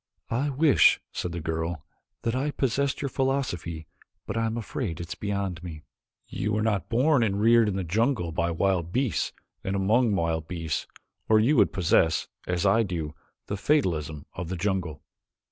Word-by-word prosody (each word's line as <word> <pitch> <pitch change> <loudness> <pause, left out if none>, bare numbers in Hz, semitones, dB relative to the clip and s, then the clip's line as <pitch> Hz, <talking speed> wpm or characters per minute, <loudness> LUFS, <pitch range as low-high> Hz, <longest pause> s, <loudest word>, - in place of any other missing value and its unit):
"I 130 +6 +1
wish," 145 +1 +5
said 90 - -3
the 85 - -4
girl, 80 -1 -3 0.4
"that 115 +1 0
I 135 +3 0
possessed 140 +1 0
your 140 - -1
philosophy 125 - -2 0.4
but - - -4
I 115 0 +1
am 110 +1 -2
afraid 110 - -4
it 85 -1 -6
is - - -3
beyond 100 -4 -3
me." 80 -4 -8 0.4
"You 105 - -2
were 110 0 +1
not 105 -4 0
born 130 +4 +3
and 100 -3 +1
reared 115 +1 +5
in 95 - -2
the 95 - -1
jungle 105 - 0
by 85 +1 0
wild 85 0 0
beasts 130 +2 0 0.3
and 95 - -2
among 105 +3 +3
wild 80 -2 -1
beasts, 80 -4 -3 0.4
or 110 0 +6
you 125 +8 +3
would - - +5
possess, 85 -3 +2 0.2
as 90 +1 0
I 100 +4 +5
do, 85 -7 -3 0.3
the 100 - -3
fatalism 80 - 0
of 85 -1 -5
the 95 - -3
jungle." 85 -5 -2
100 Hz, 180 wpm, -27 LUFS, 85-115 Hz, 0.4 s, or